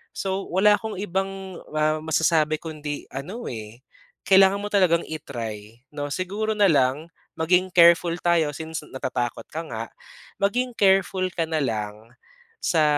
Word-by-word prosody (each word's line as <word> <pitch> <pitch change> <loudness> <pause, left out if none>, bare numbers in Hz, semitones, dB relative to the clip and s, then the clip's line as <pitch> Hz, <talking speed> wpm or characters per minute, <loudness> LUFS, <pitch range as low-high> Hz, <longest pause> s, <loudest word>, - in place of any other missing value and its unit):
So 195 0 -3
wala 200 +4 +5
akong 220 -3 -5
ibang 195 -1 -4
ah 155 0 +1
masasabi 155 -1 +2
kundi 150 -2 -6
ano 185 - -6
eh, 110 +1 -9 0.5
kailangan 195 +1 +6
mo - - -2
talagang 180 -4 +3
i-try 115 -7 -7
'no. 145 -1 -4
Siguro 205 +6 -2
na 205 -1 +5
lang 135 +1 +2 0.3
maging 180 +3 +3
careful 170 0 +6
tayo 170 -3 +2
since 160 0 -5
natatakot 125 -2 -3
ka 160 - -3
nga, 115 -3 -5 0.6
maging 245 +5 +1
careful 190 -1 +3
ka 170 -1 -1
na 160 -1 -1
lang 110 -1 -4 0.5
sa 160 -3 +3
165 Hz, 140 wpm, -24 LUFS, 145-190 Hz, 0.6 s, kailangan